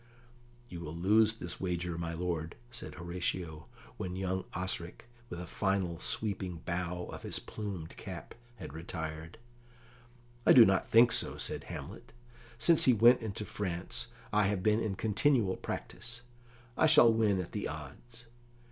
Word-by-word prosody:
"You 90 -7 -8
will 80 -1 -6
lose 105 +5 +4
this 90 -6 -4
wager, 90 -2 -2
my 85 0 -3
lord," 85 -1 -3 0.2
said 120 - -7
Horatio, 85 -2 -4 0.3
when 90 0 -4
young 95 0 -2
Osric, 90 -1 -3 0.2
with 85 - -6
a 90 - -5
final 95 -3 -1
sweeping 95 -4 -2
bow 90 0 -2
of - - -8
his - - -3
plumed 95 -7 -6
cap, - - -8 0.2
had 105 - -9
retired. 80 0 -6 1.1
"I - - +7
do 120 -3 +10
not 95 -2 +2
think 115 +1 +6
so," - - 0
said - - -1
Hamlet. - - -8 0.4
"Since 165 +7 +4
he 130 - +6
went 120 +3 +6
into 105 -1 -4
France 90 -5 -3 0.3
I 105 -1 +4
have 100 -2 -1
been 105 +1 +3
in 105 -4 -1
continual 110 -1 +2
practice. 120 0 -6 0.5
I 160 - +4
shall 150 -7 +7
win 105 -4 +2
at 90 - -4
the - - -3
odds. 80 - -9
95 Hz, 150 wpm, -32 LUFS, 85-110 Hz, 1.1 s, do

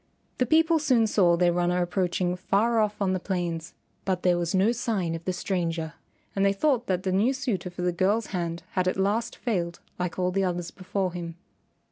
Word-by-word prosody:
The 250 - +2
people 320 +3 +4
soon 255 -7 +3
saw 180 -5 +3
their 175 0 +3
runner 175 +1 +1
approaching 180 0 0
far 215 +5 +1
off 210 -1 0
on 190 -1 +1
the 185 - 0
plains, 175 -2 -3 0.3
but 185 -2 -1
there 180 -1 +4
was 175 +1 -1
no 195 +4 +4
sign 220 -8 -1
of 165 0 -5
the 185 - +1
stranger, 170 -4 -2 0.4
and 195 - +1
they 200 0 +4
thought 245 +2 +1
that 185 -1 0
the 190 - 0
new 210 +8 +3
suitor 235 -10 -2
for 175 0 -6
the 180 - +2
girl's 195 +6 +1
hand 170 -2 -2
had 185 -1 0
at 185 - 0
last 210 +5 0
failed 175 -8 -2 0.2
like 180 -2 -2
all 180 0 +1
the 195 +1 +1
others 175 -2 -2
before 185 -1 -2
him. 170 -2 -5
185 Hz, 205 wpm, -27 LUFS, 175-210 Hz, 0.4 s, people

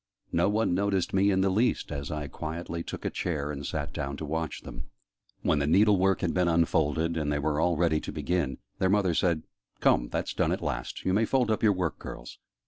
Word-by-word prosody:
No 85 +3 +2
one 110 -2 +1
noticed 95 -1 0
me 95 +1 +4
in 95 -1 +2
the 95 0 +2
least, 115 +6 +1
as 70 -1 -4
I 75 -2 -3
quietly 85 +4 -5
took - - -7
a - - 0
chair 75 -4 -2
and 70 -1 -6
sat - - -3
down 70 +1 -3
to 80 - -5
watch 80 +1 -3
them. - - -8 0.6
When 75 - +2
the 70 - 0
needle 100 +4 +5
work 95 +1 +2
had 90 -4 0
been 90 -1 +2
unfolded, 80 -1 +2
and 75 -2 -1
they 75 - +1
were 75 +1 0
all 85 -1 +2
ready 80 -2 +2
to - - -5
begin, 85 -7 -1 0.2
their 95 - +2
mother 95 -3 +3
said 85 -1 +1 0.4
"Come, - - +3
that's - - -2
done, - - +1
at - - -2
last! - - -4
You 95 - +2
may 110 +3 +3
fold 125 -1 +1
up 110 - 0
your 105 -2 +5
work, 90 -8 -2
girls." - - -9
85 Hz, 225 wpm, -28 LUFS, 75-95 Hz, 0.6 s, needle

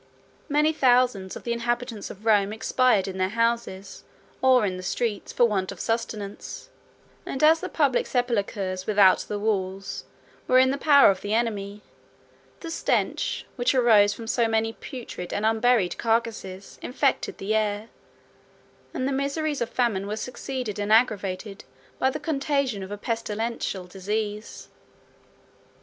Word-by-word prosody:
76 - - -34
Many 300 +2 +3
thousands 245 -9 +2
of - - -9
the 235 - -1
inhabitants 235 -2 -3
of 210 +3 -11
Rome 205 -2 +3
expired 220 -1 +2
in 190 -1 -5
their 185 0 +1
houses, 230 -4 -2 0.4
or 255 -4 +5
in 185 -2 -2
the - - -6
streets, 205 +3 -2
for 240 - +4
want 195 -5 -1
of - - -10
sustenance; 215 -3 -4 0.5
and 270 - -4
as 320 +1 +6
the - - -5
public 280 -5 +1
sepulchres 200 -6 -1
without 200 -3 +5
the 210 - -4
walls 195 -2 -2 0.4
were 255 - +5
in 260 0 +5
the 280 - -3
power 280 -7 +7
of 190 - -5
the 205 +1 -1
enemy 210 -3 -2 0.8
the 330 - -6
stench, - - -1
which 245 +2 +1
arose 220 -5 +5
from 225 +2 -7
so 230 +1 +1
many 225 0 0
putrid 230 -10 -8
and 205 - -1
unburied 225 -3 +2
carcasses, 225 -4 -2
infected 270 +2 0
the 200 +3 -2
air; 215 0 -1 1.1
and 260 - -1
the - - -1
miseries 280 +2 -1
of 235 - -1
famine 215 -6 0
were 210 - -2
succeeded 250 -3 -5
and 205 +1 -2
aggravated 205 -3 +1 0.4
by 265 - +3
the 275 - -4
contagion 275 - -1
of 190 - -7
a 205 - -4
pestilential 225 -3 -3
disease. 210 +3 -4
225 Hz, 150 wpm, -25 LUFS, 200-250 Hz, 1.1 s, power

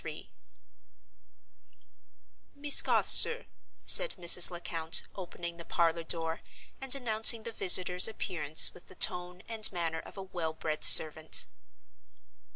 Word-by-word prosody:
"Miss 285 0 +2
Garth, - - -3
sir," 465 +2 +4 0.4
said - - +4
Mrs. 175 0 +2
Lecount, 165 -2 -4
opening 175 -2 -10
the 170 - -12
parlor 170 0 -3
door, 165 0 -7 0.4
and 270 0 -2
announcing 225 -3 +1
the 230 - -9
visitor's 180 -3 +3
appearance 160 -8 0
with 180 - -19
the 185 - -16
tone 180 +1 -2
and 225 -2 0
manner 165 -3 -6
of - - -15
a 195 - -9
well 170 -4 -8
bred 155 -1 -7
servant. 155 0 +4
180 Hz, 120 wpm, -27 LUFS, 165-215 Hz, 0.4 s, sir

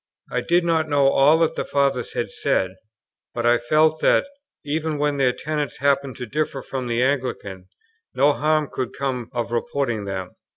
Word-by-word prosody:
I - - 0
did 175 +1 +2
not 160 -2 +1
know 140 -2 +4
all 145 +4 +5
that 165 - +2
the - - -2
Fathers 140 -3 0
had - - -2
said, 95 -1 0 0.6
but 120 -1 -2
I 120 0 +4
felt 155 +5 +2
that, - - +4 0.4
even 155 +1 -1
when 145 0 0
their 130 -2 +3
tenets 150 +3 -3
happened 140 -2 +1
to 125 - -6
differ 140 +1 -2
from 130 -2 -4
the 120 +1 +1
Anglican, 125 -9 -2 0.5
no 140 +3 +4
harm 155 0 +1
could 130 -2 -3
come 130 -4 -3
of 120 -2 -3
reporting 120 -2 -1
them. 95 -2 -4
135 Hz, 175 wpm, -22 LUFS, 120-150 Hz, 0.6 s, all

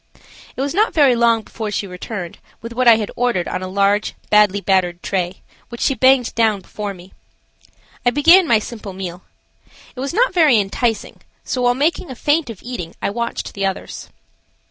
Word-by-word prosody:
It - - -4
was 280 +2 -2
not 425 +5 +1
very 280 -6 +5
long 230 -1 +2
before 220 0 -6
she 205 0 -2
returned 180 -1 -7 0.2
with 230 +1 -8
what 250 +1 +1
I 230 - +9
had 215 -2 -3
ordered 240 -8 0
on - - -3
a 185 - -4
large, 200 +2 +1 0.2
badly 210 -1 +4
battered 185 -3 0
tray, 185 -1 -3 0.3
which 235 - -9
she 275 - +2
banged 260 -2 +3
down 220 -3 +1
before 205 +2 -6
me. 180 +1 -15 0.9
I 245 - +4
began 330 +8 +5
my 230 - +5
simple 215 -2 -7
meal. 185 -1 -6 0.7
It - - -9
was 270 +1 -3
not 465 +6 +2
very 305 -10 +5
enticing, 215 +2 -2 0.2
so 255 - -3
while 245 0 +3
making 315 +5 0
a 260 - -7
feint 295 +1 0
of 220 -5 -9
eating 230 -9 -6
I - - -2
watched 235 +2 -4
the 195 -1 -1
others. 190 - -6
225 Hz, 190 wpm, -19 LUFS, 195-255 Hz, 0.9 s, I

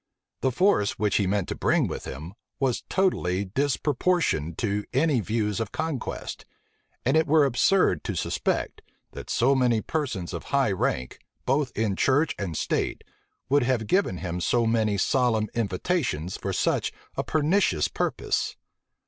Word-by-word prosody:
The 130 - +1
force 140 - +2
which 105 -1 +1
he 100 - +1
meant 100 -1 0
to - - -2
bring - - +2
with - - -5
him, 80 +7 -7 0.3
was 130 -3 0
totally 100 - +1
disproportioned 135 - 0
to 105 -2 -1
any 140 0 +3
views 105 0 -1
of 110 -3 -3
conquest; 155 -5 -4 0.6
and 130 +4 +3
it 160 0 +3
were 150 0 +5
absurd 130 - +3
to - - -2
suspect, - - -1 0.3
that - - -9
so 130 +4 +3
many 125 -4 +3
persons 120 - -3
of - - -5
high 135 -6 +2
rank, 65 -9 -2 0.3
both 135 0 +1
in 105 -3 0
church 140 +9 +2
and 90 -6 -3
state, - - -1 0.4
would 145 +2 +3
have 120 -3 +1
given 185 - +1
him 90 0 -4
so 120 +5 +2
many 110 -2 +1
solemn 110 -1 +2
invitations 100 - -1
for - - -4
such - - 0 0.2
a - - -1
pernicious 155 - +2
purpose. - - -1
120 Hz, 150 wpm, -26 LUFS, 100-145 Hz, 0.6 s, were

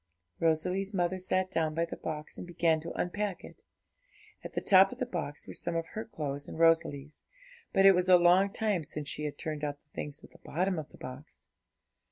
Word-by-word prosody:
Rosalie's 180 +5 +1
mother 180 0 0
sat 185 0 0
down 155 -1 0
by 165 +1 +1
the 170 - -7
box, 155 -1 -6
and - - -8
began 165 -2 +1
to 170 - -6
unpack 200 +1 -2
it. - - -13 0.8
At - - -9
the - - +1
top 190 0 +6
of 250 - -8
the 255 - -1
box 170 -10 -5
were - - -8
some 170 -1 -2
of 165 0 -1
her 220 +1 -5
clothes 145 -8 -5
and - - -8
Rosalie's; 160 -3 +2 0.5
but 195 - +4
it 195 - +10
was 180 0 +1
a 180 - +9
long 180 +3 +5
time 210 -6 0
since 150 0 -6
she 150 +1 -3
had 150 - -4
turned 155 -1 -4
out 145 -1 -2
the 145 - -45
things 145 -1 -6
at - - -14
the - - -18
bottom 180 +2 -1
of 155 - -7
the - - -16
box. 130 +4 -10
170 Hz, 220 wpm, -30 LUFS, 150-185 Hz, 0.8 s, it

